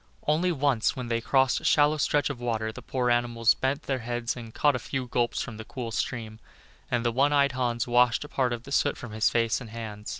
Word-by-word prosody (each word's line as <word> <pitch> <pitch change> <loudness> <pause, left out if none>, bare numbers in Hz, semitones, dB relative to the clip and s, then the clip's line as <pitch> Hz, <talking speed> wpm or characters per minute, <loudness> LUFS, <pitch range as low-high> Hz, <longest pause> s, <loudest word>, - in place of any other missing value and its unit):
Only 165 +4 +2
once, 140 -7 +1
when 125 -2 -5
they 115 0 0
crossed 130 +2 +2
a - - -16
shallow 150 +1 +4
stretch 145 0 +1
of 130 - -8
water, 110 -2 -2
the - - -10
poor 125 -2 -1
animals 120 -1 +3
bent 135 +3 -2
their 135 -2 -2
heads 120 0 -3
and 115 -2 -9
caught 145 +4 +2
a - - -2
few 135 0 -4
gulps 120 -1 -1
from 110 - -8
the 110 - -7
cool 115 +1 -6
stream, 110 -1 -3 0.5
and 120 -1 0
the 120 - +2
One 135 +5 +2
eyed 140 -1 +3
Hans 120 -2 -1
washed 120 +1 +3
a - - -9
part 130 -4 0
of 120 -1 -4
the 140 - -11
soot - - +1
from 120 - -8
his 110 +1 +1
hands 115 +1 +1
and 120 - -9
face. 115 - -10
120 Hz, 240 wpm, -27 LUFS, 115-135 Hz, 0.5 s, shallow